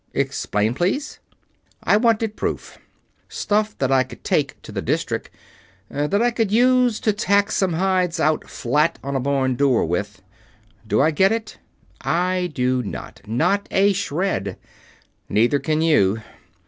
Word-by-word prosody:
"Explain, 105 +3 0
please?" 185 - -2 0.6
"I - - +4
wanted 225 -1 +2
proof. - - -4 0.5
Stuff 210 +1 -1
that 135 -1 0
I 135 -1 +5
could 130 - -7
take - - 0
to - - -10
the - - -3
District - - -2 0.6
that 150 +10 0
I 240 - +3
could 225 -4 -1
use 250 0 +3
to 215 - +2
tack 200 0 +2
some 185 -3 +1
hides 180 0 0
out 155 +1 +1
flat 150 +7 0
on 140 +1 -3
a - - +1
barn 135 0 0
door 130 -5 +2
with. 95 +3 -3 0.6
Do 115 - +2
I 155 +3 +3
get 190 +6 +3
it? 225 -1 -4 0.4
I 180 +1 0
do 125 -2 0
not. 105 - -8
Not 195 - +1
a 200 +1 +3
shred. 180 - -2 0.7
Neither 120 +7 +2
can 155 +1 0
you. 110 -9 +2
165 Hz, 150 wpm, -21 LUFS, 130-205 Hz, 0.7 s, I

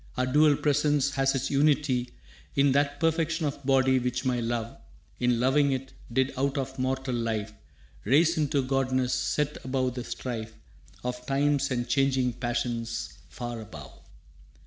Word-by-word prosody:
Our 125 - +2
dual 145 +3 +4
presence 145 -1 +2
has 135 0 +1
its 135 0 -2
unity 140 -3 +2 0.5
In 140 0 +4
that 145 +1 +1
perfection 165 0 +1
of 140 -1 -4
body, 130 -1 +3
which 125 +1 -2
my 125 -1 +1
love, 115 0 -2 0.4
In 125 -1 +2
loving 140 +3 +3
it, 135 0 -5 0.2
did 130 +2 +1
out 135 +2 0
of 135 -1 -4
mortal 130 0 -1
life 110 -3 -2 0.5
Raise 165 +5 +4
into 145 -3 +1
godness, 130 -1 0
set 145 +4 -1
above 130 -1 -1
the 125 -1 -5
strife 115 -3 -5 0.5
Of 125 0 -4
times 140 0 +1
and 120 -2 -1
changing 135 -3 +2
passions 120 -1 -3
far 120 -1 -6
above. 80 -9 -10
130 Hz, 145 wpm, -27 LUFS, 125-140 Hz, 0.5 s, dual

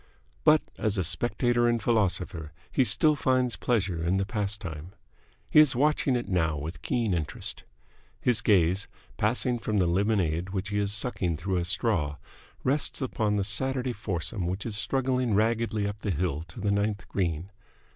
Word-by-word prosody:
But - - +5 0.2
as 105 -1 0
a 95 - +1
spectator 120 +7 +1
and 120 0 +1
philosopher 90 -7 0 0.2
he 135 - +3
still 155 +4 +4
finds 130 -3 +1
pleasure 95 -8 -1
in 90 +3 +1
the 95 - 0
pastime. 100 -6 -4 0.5
He - - +5
is 150 -4 +6
watching 145 0 +2
it 120 - -2
now 80 -5 0
with 75 +2 -6
keen 115 -1 0
interest. 80 -4 -4 0.5
His 120 -3 +1
gaze, 95 -3 +3 0.3
passing 120 +3 +1
from 110 -2 -1
the 95 - +3
lemonade 90 -2 0
which 95 +1 -3
he 105 0 -1
is 100 -1 0
sucking 100 -6 0
through 95 +4 -2
a 85 - -1
straw, 85 -5 0 0.5
rests 140 +3 +1
upon 110 -5 -1
the 100 - +1
Saturday 130 +4 +1
foursome 95 -2 -3
which 95 +3 -3
is 110 -3 -1
struggling 125 +2 +1
raggedly 110 -1 +1
up 105 +1 -6
the 105 - -3
hill 80 -3 -1
to 85 - -11
the 100 -1 0
ninth 100 -1 -1
green. 85 0 -2
100 Hz, 165 wpm, -27 LUFS, 90-120 Hz, 0.5 s, is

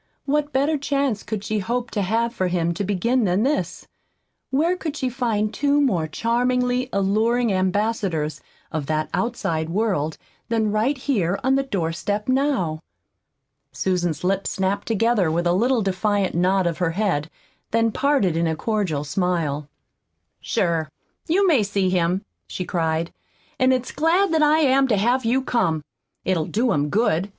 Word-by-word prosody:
What 290 +1 0
better 285 +3 +1
chance 275 -6 0
could 210 -2 -5
she 215 0 -1
hope 235 +4 -2
to 205 - -1
have 230 +4 0
for 185 -6 -1
him 170 -1 0
to 185 - -3
begin 215 +6 +1
than 185 +3 +2
this? 290 +3 -1 0.6
Where 320 +7 +2
could 315 -4 -5
she 260 - -1
find 225 -4 -1
two 285 0 +2
more 190 - +1
charmingly 250 +6 0
alluring 220 +4 +1
ambassadors 185 -4 -1 0.3
of 155 -4 -3
that 155 0 -1
outside 165 -9 -1
world 175 -6 -1 0.3
than 220 -2 +1
right 230 +7 +1
here 200 -9 0
on 265 +1 +3
the 275 - +3
door 195 -12 -2
step 205 +5 -3
now? 255 - +1 0.9
Susan's 175 -4 -1
lips 195 +1 0
snapped 190 +1 -1
together 225 -4 +2
with 170 +2 0
a 175 - +3
little 235 +4 +2
defiant 195 +1 0
nod 185 +2 +2
of 170 0 -1
her 170 -2 0
head, 175 -8 0 0.4
then 230 0 +2
parted 270 - +1
in 165 0 +1
a 160 - 0
cordial 190 -7 -1
smile. 150 -3 -1 0.7
"Sure, 165 -2 0 0.4
you 385 +5 +3
may 310 - +4
see 195 -2 0
him," 180 +1 0 0.2
she 180 - -5
cried, 165 -1 -1 0.5
"an' 255 0 +4
it's 255 -1 0
glad 335 +4 +2
that 320 - +3
I 305 +1 +4
am 270 -1 +4
to 220 -5 +2
have 240 +5 +1
you 255 +3 +2
come! 165 - 0 0.4
It'll 175 -4 +1
do 235 +3 +1
him 145 0 +1
good. 200 -3 +1
210 Hz, 160 wpm, -23 LUFS, 175-255 Hz, 0.9 s, may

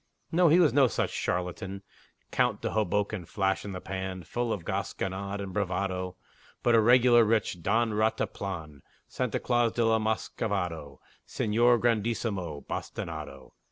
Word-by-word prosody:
No, 175 +1 +4
he 160 - +6
was 165 -5 +4
no 135 -2 +6
such 115 - -1
charlatan 90 +2 -3 0.5
Count - - +1
de - - -1
Hoboken 105 -1 0
Flash 95 +2 -1
in 100 - -6
the 90 - -5
pan, 95 -1 -5
Full 120 +4 -2
of 90 -7 -3
gasconade 100 +1 -3
and 100 -2 -5
bravado 95 -2 -2 0.5
But 120 - +4
a 115 - +6
regular, 120 +1 +6
rich 110 -5 0
Don 115 +6 +2
Rataplan, 95 -8 -2 0.3
Santa - - -2
Claus 120 -2 +1
de 120 - +1
la 115 0 +3
Muscovado, 100 - -2 0.3
Señor 120 +3 +3
Grandissimo 110 -9 -1
Bastinado. 70 -1 -6
105 Hz, 140 wpm, -28 LUFS, 95-115 Hz, 0.5 s, he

